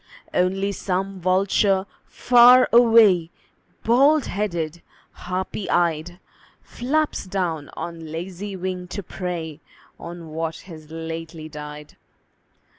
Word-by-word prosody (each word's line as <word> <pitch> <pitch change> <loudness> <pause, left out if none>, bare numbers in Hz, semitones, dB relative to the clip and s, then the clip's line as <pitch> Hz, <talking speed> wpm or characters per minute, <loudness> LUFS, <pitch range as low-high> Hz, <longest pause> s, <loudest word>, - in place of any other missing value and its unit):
Only 195 +2 +1
some 195 0 -3
vulture 190 +1 +2 0.2
far 250 +1 +6
away, 225 -8 +6 0.5
Bald 275 +6 +4
headed, 175 -5 -3 0.3
harpy 185 +2 -5
eyed, 175 0 0 0.4
Flaps 295 0 -2
down 170 -6 -2
on 165 -2 -6
lazy 185 +4 -6
wing 180 -1 -4
to 200 +2 -6
prey 165 -4 -5 0.4
On 170 -1 -9
what 160 +1 -3
has 160 -4 -12
lately 160 0 -7
died. 150 -1 -10
180 Hz, 100 wpm, -23 LUFS, 165-200 Hz, 0.5 s, far